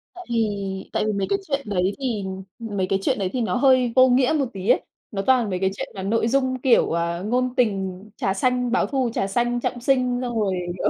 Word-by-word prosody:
Tại 365 0 -10
vì 200 -4 -2
tại - - 0
vì 215 - +1
mấy 200 -1 -1
cái 395 - +1
chuyện 275 -2 -1
đấy 190 0 +1
thì 240 -7 -2 0.4
mấy 205 -5 -2
cái 195 +1 +1
chuyện - - 0
đấy 190 -2 -1
thì 255 - -1
nó 225 - 0
hơi 255 -2 +4
vô 260 0 +7
nghĩa 255 +4 +3
một 275 - +2
tí 190 0 -4
ấy. - - +5 0.3
Nó 195 - -2
toàn 245 -1 +3
mấy 185 -2 -2
cái 190 0 +2
chuyện - - -4
mà 190 - -5
nội 225 +3 +1
dung, 260 +1 +1
kiểu, 250 -3 +4
à, 170 0 -1
ngôn 250 +6 -1
tình, 195 -5 0
trà 195 - 0
xanh, 250 +4 0
báo 245 - +2
thù 265 -3 0
trà 195 - 0
xanh, 240 +4 0
trọng 245 0 -2
sinh, 250 -1 +1
xong 240 -2 -2
rồi, 200 -3 +1 0.2
kiểu, - - +1
230 Hz, 240 wpm, -23 LUFS, 195-255 Hz, 0.4 s, vô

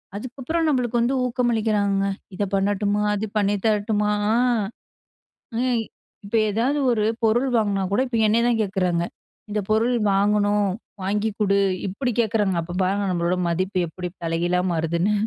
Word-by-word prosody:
அதுக்கப்புறம் 265 +9 -2
நம்மளுக்கு 245 -4 +1
வந்து 245 +3 +1
ஊக்கமளிக்கிறாங்க! 220 -5 +1 0.3
இதை 205 - 0
பண்ணட்டுமா? 205 +1 +1
அது 205 +2 -2
பண்ணி 205 0 +2
தரட்டுமா? 210 0 +1 0.2
அ? - - +3 1.3
எ - - +1 0.5
இப்ப 205 +3 -4 0.2
ஏதாவது 250 +8 +1
ஒரு 215 -3 +1 0.2
பொருள் 240 +4 +3
வாங்கினா 205 -3 +1
கூட, 205 - +2
இப்ப 240 -2 -2
என்னை 220 +2 +3
தான் 235 -2 +2
கேட்குறாங்க! 185 -4 0 0.5
இந்த 210 - 0
பொருள் 230 +3 +2 0.2
வாங்கணும். 205 0 +2 0.3
வாங்கிக் 210 +2 -1
கொடு. 200 -2 +2 0.3
இப்படி 245 +7 -2
கேட்குறாங்க. 210 -4 +1
அப்ப 175 +2 -7
பாருங்க, 195 +2 +1
நம்மளோட 175 0 0
மதிப்பு 185 +2 -1
எப்படி 180 +2 -6
தலைகீழா 170 +2 0
மாறுதுன்னு. 170 +4 0
205 Hz, 140 wpm, -23 LUFS, 195-230 Hz, 1.3 s, அ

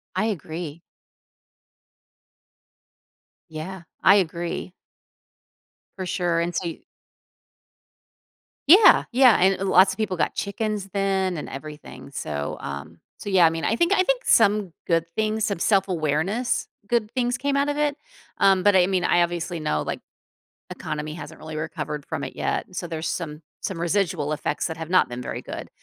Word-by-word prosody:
I 215 - +1
agree. 165 -5 -5 2.7
Yeah. 170 +4 -7 0.2
I 195 - +7
agree. 175 -1 -2 1.3
For 185 - -3
sure. 175 -2 0
And 170 0 -2
so 175 - -2
y 165 - -7 1.9
Yeah. 385 +7 +8
Yeah. 250 -2 +6
And 190 +1 +4
l 195 - -1
lots 190 +1 +6
of - - -8
people 190 -4 -1
got - - 0
chickens 210 -1 -3
then 195 -2 0
and 150 - -6
everything. 140 -2 -9
So, 75 - -4
um, 70 0 -7 0.2
so - - -8
yeah. 185 -4 +5
I 160 - +4
mean, 165 0 -4
I 225 - +1
think 340 +8 +2
I 370 - +5
think - - 0
some 205 -4 +3
good 165 -2 +2
things, 220 0 0
some 200 -4 -1
self-awareness, 185 - 0 0.2
good 225 -1 0
things 245 -1 0
came 280 0 0
out 280 +1 +1
of 290 - -1
it. 295 -1 0 0.4
Um, 195 -1 +4
but 205 0 +5
I 180 -1 +5
mean, 185 -2 0
I 175 - +4
obviously 175 0 -2
know, 75 - 0
like, - - -4 0.7
economy 150 0 -5
hasn't 175 - -9
really 155 0 -8
recovered 155 -2 -4
from - - -4
it - - -8
yet, - - -1
so 175 - -3
there's 160 -1 -4
some 160 -2 -4 0.2
some 185 -3 -4
residual 170 -4 0
effects 150 - -2
that 160 -1 -6
have 160 0 -6
not 185 0 +4
been 120 +1 -6
very - - -5
good. - - -7
180 Hz, 165 wpm, -24 LUFS, 160-205 Hz, 2.7 s, Yeah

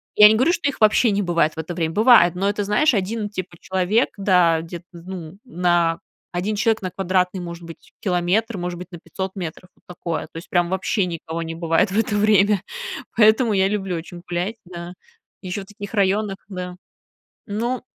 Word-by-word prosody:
Я 210 0 +10
не 220 - +4
говорю, 255 +9 +3
что 345 -5 0
их 280 - -3
вообще 215 +1 +5
не 200 +1 +1
бывает 170 -4 +1
в - - -23
это 160 +2 -4
время. 165 -1 -2
Бывает, 215 -6 +6
но 195 +2 +1
это, 205 0 -1
знаешь, 245 +8 +3
1 205 +2 -1
типа 185 -3 -6
человек, 190 +5 +1
да, 180 -5 +4
где-то, 170 +1 -9
ну, 175 0 -9
на 175 -6 +1 0.3
1 195 +5 -1
человек 220 0 +2
на 185 - -4
квадратный, 185 0 0
может 170 -1 -7
быть, 165 -1 -12
километр, 195 +3 0
может 175 -1 -4
быть, 180 +1 -9
на 175 - -9
500 190 +3 -5
метров. 180 -1 -6
Вот - - -32
такое, 170 -2 -4
то - - -52
есть 165 - -9
прям 175 -1 +2
вообще 190 +1 0
никого 165 -1 -5
не 165 0 -5
бывает 165 +3 +1
в 200 - -1
это 220 -1 +1
время. 205 -2 +4 0.5
Поэтому 220 +1 +5
я 190 -1 +3
люблю 195 -3 -2
очень 175 +1 -7
гулять, 180 +6 -2
да, 175 0 -8 0.5
еще 185 +1 -4
в - - -10
таких 205 +1 -9
районах, 200 0 +1
да. 180 -1 -6 0.7
Ну 235 +5 -2
185 Hz, 195 wpm, -22 LUFS, 175-210 Hz, 0.7 s, Я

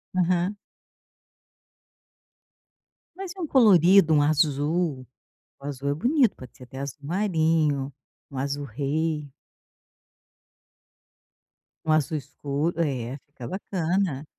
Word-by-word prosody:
Aham. 180 +2 +1 2.6
Mas 380 -1 -6
e - - -12
um 340 - -2
colorido, 195 - +6
um 150 - +5
azul? 150 -1 +1 0.5
O - - -15
azul 140 -1 -4
é 140 - +1
bonito. 245 - +2
Pode 130 -2 -13
ser 125 - -12
até 130 +2 -10
azul-marinho, 155 -1 0 0.4
um 135 - -6
azul-rei. 145 +3 -2 2.6
Um 155 - +1
azul 155 +1 +2
escuro 145 +3 -3
é, 130 -3 -2
fica 135 -4 -9
bacana. 180 -5 -2
155 Hz, 95 wpm, -25 LUFS, 140-180 Hz, 2.6 s, colorido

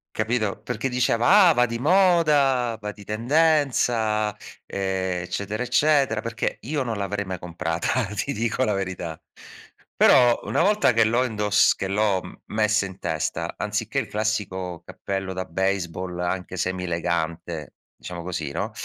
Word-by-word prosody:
Capito? 110 -2 -1
Perché 115 +4 -3
diceva: 125 - +4
"Ah, - - +6
va 125 -4 +3
di 115 0 -4
moda, 150 -8 +3
va 105 0 -5
di 105 - -14
tendenza", 115 -4 +1 0.3
ehm, 95 -2 -2
eccetera, 100 +5 -3
eccetera, 135 -3 +2
perché 115 0 -3
io 145 +3 -2
non 115 -3 -3
l'avrei 100 +1 -2
mai 95 -1 -5
comprata, 85 +7 -2
ti 140 +7 -2
dico 115 +3 0
la 105 - +1
verità. 95 -4 -4 0.7
Però 120 -2 +5
una - - +1
volta 205 -7 +3
che 115 0 +4
l'ho 120 +4 +2
indos 105 -3 +3
che 95 - -4
l'ho 100 -1 -1
messa 105 -1 +1
in 95 -1 -10
testa, - - -3
anziché - - -2
il - - -1
classico 95 -5 -3
cappello 95 +1 -4
da 95 0 -3
baseball, 90 0 -2
anche 90 +1 -3
semi-elegante, 85 -3 -3 0.2
diciamo 85 -1 -7
così, 85 -4 -4
no? 100 +8 -3
105 Hz, 145 wpm, -24 LUFS, 95-125 Hz, 0.7 s, Ah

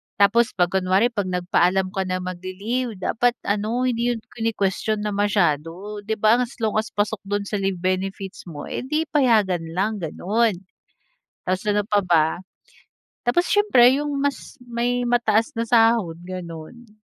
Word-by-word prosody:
Tapos 230 +5 +3
'pag 175 -2 +2
kunwari 190 +5 +2
'pag 205 -5 -2
nagpaalam 180 +1 +1
ka 190 -2 -2
na 185 0 -1
mag-li-leave 195 +7 -4
dapat 235 +6 +1
ano, 215 +5 0
hindi 235 -1 0
'yon 230 - -6 0.2
kinukwestyon 215 -1 -1
na 210 - -1
masyado, 195 -1 0
'di 220 +1 -1
ba? 220 +3 +4
As 250 +1 -4
long 215 0 +1
as 220 - -3
pasok 205 +1 0
do'n 205 0 -1
sa 205 0 -3
leave 195 -1 0
benefits 190 +1 -3
mo, 145 -3 -7
eh, - - -3
'di 305 +3 +1
payagan 215 - +2
lang, 210 +3 0
gano'n. 205 +7 0 0.9
Tapos 185 +1 0
ano 205 0 +2
pa 210 -2 +3
ba? 170 -4 +4 1.0
Tapos 350 +9 +2
siyempre 265 -12 +5
yung 295 -1 -3
mas 285 0 -3
may 245 +1 -1
mataas 225 -2 +2
na 230 - 0
sahod, 225 -7 +3
gano'n. 185 +5 -9
210 Hz, 155 wpm, -23 LUFS, 185-235 Hz, 1.0 s, siyempre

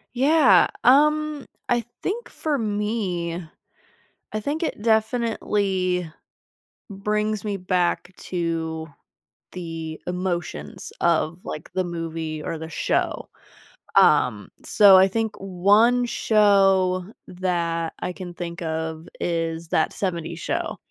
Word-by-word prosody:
Yeah. 265 - +5 0.2
Um, 300 +2 +3 0.2
I 240 -2 +1 0.2
think 460 +5 -3
for 305 -2 -2
me 205 -6 -2 0.9
I 215 - -1
think 290 +9 -2
it 260 - -3
definitely 210 -6 0 0.8
brings 210 +1 -1
me 205 -2 -2
back 180 0 -1
to 165 -2 -3 0.7
the 165 -3 -6
emotions 180 -1 -4
of, 170 +1 +1
like, 150 - -7
the 185 -1 0
movie 165 -2 -4
or 160 - -4
the 160 0 -7
show. - - -1 0.7
Um, - - +4
so 200 -3 +7
I 190 +1 +6
think 220 +2 -2
1 205 +6 +3
show 195 -5 +3 0.2
that 170 -2 -2
I 180 - -3
can 180 -2 -8
think 175 +1 -6
of 160 0 -4
is 165 -1 -2
That 160 - +1
70s 170 -3 -3
Show. - - -3
185 Hz, 110 wpm, -23 LUFS, 170-215 Hz, 0.9 s, so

